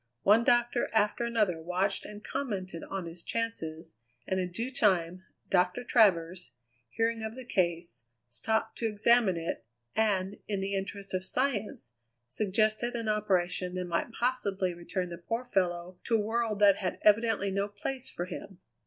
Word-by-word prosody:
One 215 Hz, +4 st, +6 dB
doctor 240 Hz, 0 st, +2 dB
after 215 Hz, +2 st, +2 dB
another 210 Hz, -8 st, +1 dB
watched 185 Hz, +4 st, 0 dB
and 210 Hz, 0 st, -10 dB
commented 195 Hz, -11 st, -4 dB
on 195 Hz, -2 st, -4 dB
his 170 Hz, +1 st, -6 dB
chances, 165 Hz, -, -4 dB, 0.3 s
and 190 Hz, -, 0 dB
in 180 Hz, -1 st, -2 dB
due 230 Hz, +8 st, -3 dB
time 185 Hz, -6 st, +2 dB, 0.3 s
Doctor 180 Hz, +5 st, +2 dB
Travers, 180 Hz, -, +3 dB, 0.4 s
hearing 225 Hz, -, 0 dB
of 220 Hz, +1 st, -4 dB
the 260 Hz, -1 st, -8 dB
case, 170 Hz, -, -1 dB, 0.2 s
stopped 220 Hz, -, -1 dB
to 230 Hz, -, +1 dB
examine 215 Hz, -2 st, +3 dB
it, 165 Hz, 0 st, -3 dB, 0.3 s
and, 200 Hz, -3 st, +1 dB
in 205 Hz, -2 st, -1 dB
the 195 Hz, +1 st, -2 dB
interest 195 Hz, 0 st, -4 dB
of 185 Hz, 0 st, -1 dB
science, 205 Hz, -, -2 dB, 0.3 s
suggested 215 Hz, -, 0 dB
an 230 Hz, -2 st, -2 dB
operation 185 Hz, -3 st, 0 dB
that 180 Hz, 0 st, -2 dB
might 175 Hz, +6 st, -1 dB
possibly 205 Hz, -7 st, 0 dB
return 175 Hz, +1 st, -4 dB
the 170 Hz, -, -7 dB
poor 230 Hz, +8 st, -3 dB
fellow 180 Hz, -5 st, -1 dB
to 230 Hz, -, +2 dB
a -, -, +3 dB
world 225 Hz, 0 st, 0 dB
that 200 Hz, -1 st, +6 dB
had 185 Hz, -3 st, -2 dB
evidently 210 Hz, -2 st, +4 dB
no 200 Hz, +1 st, 0 dB
place 255 Hz, +5 st, -5 dB
for 175 Hz, -, -4 dB
him. 185 Hz, 0 st, -8 dB
200 Hz, 160 wpm, -30 LUFS, 180-225 Hz, 0.4 s, One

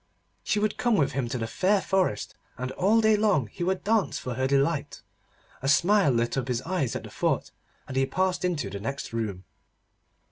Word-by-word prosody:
She -, -, 0 dB
would 210 Hz, 0 st, 0 dB
come 240 Hz, -2 st, +3 dB
with 145 Hz, -8 st, +2 dB
him 130 Hz, -2 st, -2 dB
to 125 Hz, -, -2 dB
the 115 Hz, -, -2 dB
fair 190 Hz, -, +2 dB
forest, 185 Hz, -, 0 dB, 0.2 s
and 130 Hz, +1 st, -4 dB
all 210 Hz, +9 st, +3 dB
day 220 Hz, -1 st, +5 dB
long 205 Hz, -, +2 dB
he 110 Hz, -, -6 dB
would 190 Hz, +1 st, -1 dB
dance 215 Hz, -1 st, +1 dB
for 125 Hz, -, -4 dB
her 130 Hz, +2 st, 0 dB
delight. 140 Hz, +3 st, 0 dB, 0.6 s
A 135 Hz, -, 0 dB
smile 190 Hz, +4 st, +4 dB
lit 120 Hz, +1 st, +1 dB
up 125 Hz, -, -4 dB
his 125 Hz, -1 st, -1 dB
eyes 165 Hz, -7 st, -1 dB
at -, -, -4 dB
the -, -, -10 dB
thought, -, -, -1 dB, 0.4 s
and 130 Hz, -, -7 dB
he 135 Hz, 0 st, +2 dB
passed 185 Hz, +6 st, 0 dB
into 155 Hz, -, -1 dB
the 100 Hz, -, -5 dB
next 135 Hz, +4 st, -5 dB
room. 105 Hz, -5 st, -3 dB
140 Hz, 205 wpm, -27 LUFS, 125-190 Hz, 0.6 s, day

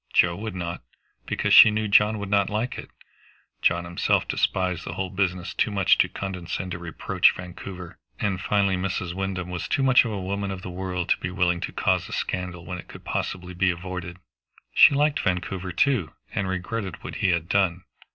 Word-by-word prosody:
Joe 85 Hz, -1 st, +4 dB
would 105 Hz, 0 st, -5 dB
not, 85 Hz, -1 st, -4 dB, 0.5 s
because -, -, 0 dB
she -, -, +10 dB
knew 110 Hz, 0 st, -1 dB
John 105 Hz, +1 st, +4 dB
would 100 Hz, -1 st, -5 dB
not 100 Hz, -1 st, +3 dB
like 110 Hz, +4 st, -2 dB
it; -, -, -9 dB, 0.7 s
John 85 Hz, +1 st, +2 dB
himself 85 Hz, 0 st, +1 dB
despised 90 Hz, -2 st, 0 dB
the 85 Hz, -, -5 dB
whole 95 Hz, -1 st, -3 dB
business 90 Hz, -2 st, -1 dB
too -, -, +1 dB
much 100 Hz, -2 st, +3 dB
to -, -, +4 dB
condescend 90 Hz, -1 st, -5 dB
to 85 Hz, -, -4 dB
reproach 85 Hz, -2 st, +2 dB
Vancouver; 90 Hz, 0 st, -9 dB, 0.2 s
and, 95 Hz, -3 st, -1 dB
finally, 100 Hz, 0 st, +2 dB
Mrs. 90 Hz, -1 st, -2 dB
Wyndham 95 Hz, -1 st, -3 dB
was 90 Hz, -, -4 dB
too 135 Hz, -, 0 dB
much 130 Hz, -1 st, +6 dB
a 120 Hz, -, -3 dB
woman 100 Hz, -1 st, -3 dB
of 95 Hz, -1 st, -6 dB
the 90 Hz, -, -6 dB
world 90 Hz, -1 st, -3 dB
to -, -, +4 dB
be -, -, -3 dB
willing 90 Hz, -1 st, +1 dB
to -, -, -4 dB
cause -, -, 0 dB
a -, -, -7 dB
scandal 90 Hz, -2 st, -3 dB
when 90 Hz, +1 st, -5 dB
it -, -, -11 dB
could -, -, -12 dB
possibly 90 Hz, -1 st, -3 dB
be 90 Hz, +1 st, +2 dB
avoided. 90 Hz, 0 st, -5 dB, 0.6 s
She 140 Hz, -, +7 dB
liked 150 Hz, +1 st, +2 dB
Vancouver 95 Hz, 0 st, -2 dB
too, 105 Hz, -, +1 dB, 0.2 s
and 100 Hz, -, -1 dB
regretted 95 Hz, +2 st, -4 dB
what -, -, -6 dB
he 95 Hz, -, +1 dB
had 85 Hz, -2 st, 0 dB
done. 90 Hz, -2 st, +1 dB
95 Hz, 195 wpm, -25 LUFS, 90-100 Hz, 0.7 s, she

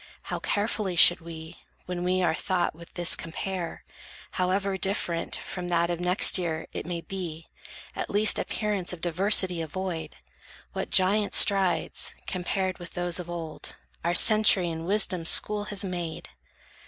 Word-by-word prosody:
How -, -, -5 dB
carefully 205 Hz, -2 st, -2 dB
should 175 Hz, +1 st, +8 dB
we, 160 Hz, -1 st, -10 dB, 0.3 s
when 180 Hz, -1 st, -5 dB
we 185 Hz, +1 st, 0 dB
our 160 Hz, -, +1 dB
thought 175 Hz, +1 st, -2 dB
With 170 Hz, +2 st, -15 dB
this 175 Hz, 0 st, +4 dB
compare, 170 Hz, +1 st, -6 dB, 0.5 s
however 190 Hz, +1 st, -1 dB
different 185 Hz, -3 st, -2 dB
From 180 Hz, -1 st, -6 dB
that 170 Hz, 0 st, 0 dB
of 170 Hz, -, -4 dB
next 180 Hz, +2 st, +4 dB
year 165 Hz, -3 st, -3 dB
it -, -, -6 dB
may 175 Hz, -1 st, -4 dB
be, 165 Hz, -4 st, -7 dB, 0.5 s
at -, -, -5 dB
least 210 Hz, +1 st, +4 dB
Appearance 205 Hz, -5 st, -2 dB
of 175 Hz, -, -10 dB
diversity 180 Hz, 0 st, +2 dB
avoid! 165 Hz, -, -6 dB, 0.6 s
What -, -, -4 dB
giant 200 Hz, +3 st, +2 dB
strides, 195 Hz, -3 st, +3 dB
compared 185 Hz, 0 st, -3 dB
with 175 Hz, -, -10 dB
those 175 Hz, 0 st, -1 dB
of 175 Hz, -1 st, -8 dB
old, 165 Hz, -2 st, -7 dB, 0.3 s
Our 170 Hz, +1 st, 0 dB
century 210 Hz, -5 st, +5 dB
in 160 Hz, 0 st, -6 dB
wisdom's 185 Hz, -3 st, +2 dB
school 210 Hz, -1 st, +3 dB
has 205 Hz, -1 st, -3 dB
made! 175 Hz, -3 st, -6 dB
180 Hz, 150 wpm, -26 LUFS, 170-195 Hz, 0.6 s, should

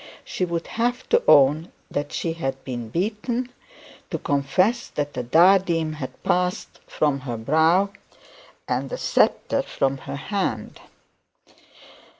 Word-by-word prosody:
She 185 Hz, -, -2 dB
would 170 Hz, -1 st, -3 dB, 0.2 s
have 245 Hz, +2 st, 0 dB
to 475 Hz, 0 st, +4 dB
own 150 Hz, +4 st, +5 dB, 0.2 s
that 145 Hz, 0 st, -3 dB
she 165 Hz, -, -2 dB
had 135 Hz, -5 st, -4 dB
been 120 Hz, -3 st, -5 dB
beaten, 225 Hz, -, -2 dB, 0.6 s
to -, -, -2 dB
confess 180 Hz, -, +1 dB
that 145 Hz, -1 st, -4 dB
the 125 Hz, -, -3 dB
diadem 165 Hz, +3 st, +4 dB
had 145 Hz, -4 st, -8 dB
passed 180 Hz, +1 st, -1 dB
from 145 Hz, -3 st, 0 dB
her 125 Hz, -3 st, -5 dB
brow, 160 Hz, -, +3 dB, 0.8 s
and -, -, -1 dB
the -, -, -4 dB
sceptre -, -, +2 dB
from 135 Hz, 0 st, -1 dB
her -, -, -6 dB
hand! 140 Hz, -, -3 dB
160 Hz, 130 wpm, -23 LUFS, 135-195 Hz, 0.8 s, own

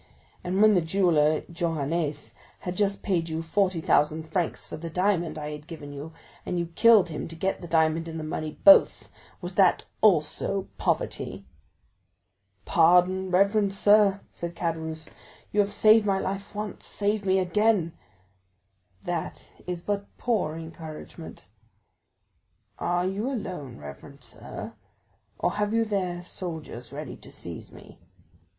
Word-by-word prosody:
And 190 Hz, +3 st, +2 dB
when 215 Hz, 0 st, +7 dB
the 180 Hz, -, +4 dB
jeweller 160 Hz, -3 st, +2 dB
Johannes 160 Hz, -2 st, -2 dB, 0.3 s
had 180 Hz, 0 st, -4 dB
just 200 Hz, -1 st, 0 dB
paid 170 Hz, -5 st, 0 dB
you 160 Hz, +1 st, -3 dB
45,000 165 Hz, -4 st, +1 dB
francs 175 Hz, 0 st, -2 dB
for -, -, -7 dB
the 165 Hz, +1 st, -6 dB
diamond 175 Hz, -2 st, 0 dB
I 150 Hz, 0 st, -5 dB
had 150 Hz, 0 st, -9 dB
given 150 Hz, -4 st, -8 dB
you, 145 Hz, +3 st, -7 dB, 0.3 s
and 180 Hz, -, -3 dB
you 170 Hz, -1 st, -2 dB
killed 220 Hz, -5 st, +6 dB
him 155 Hz, -, -5 dB
to 165 Hz, -, -9 dB
get 190 Hz, +4 st, -2 dB
the 175 Hz, -, -7 dB
diamond 160 Hz, 0 st, +2 dB
and 165 Hz, 0 st, -5 dB
the -, -, -5 dB
money 155 Hz, 0 st, -4 dB
both, 295 Hz, -, +7 dB, 0.3 s
was 175 Hz, 0 st, -5 dB
that 190 Hz, -3 st, +4 dB, 0.2 s
also 190 Hz, 0 st, +2 dB
poverty?" 95 Hz, +2 st, -2 dB, 1.2 s
"Pardon, 180 Hz, +3 st, +4 dB
reverend 200 Hz, +2 st, +3 dB
sir," 205 Hz, -1 st, +4 dB
said 170 Hz, 0 st, -6 dB
Caderousse; 160 Hz, -2 st, -3 dB, 0.4 s
"you 210 Hz, -, 0 dB
have 205 Hz, 0 st, +3 dB
saved 215 Hz, +1 st, +5 dB
my 195 Hz, -1 st, +2 dB
life 195 Hz, +2 st, -4 dB
once, 210 Hz, 0 st, -5 dB
save 205 Hz, 0 st, -1 dB
me 190 Hz, 0 st, +2 dB
again!" 190 Hz, -2 st, +2 dB, 1.1 s
"That 175 Hz, -2 st, -4 dB, 0.2 s
is 175 Hz, -1 st, -4 dB
but 200 Hz, -1 st, -2 dB
poor 220 Hz, -10 st, 0 dB
encouragement." 160 Hz, -1 st, -9 dB, 1.3 s
"Are 175 Hz, 0 st, 0 dB
you 200 Hz, +7 st, -1 dB
alone, 180 Hz, -, -5 dB
reverend 70 Hz, -1 st, -11 dB
sir, -, -, -8 dB, 0.6 s
or -, -, 0 dB
have 210 Hz, +1 st, -1 dB
you 230 Hz, 0 st, +3 dB
there 185 Hz, -4 st, -2 dB
soldiers 160 Hz, -10 st, -7 dB
ready 145 Hz, -1 st, -6 dB
to -, -, -14 dB
seize -, -, -8 dB
me?" -, -, -15 dB
175 Hz, 140 wpm, -26 LUFS, 160-200 Hz, 1.3 s, when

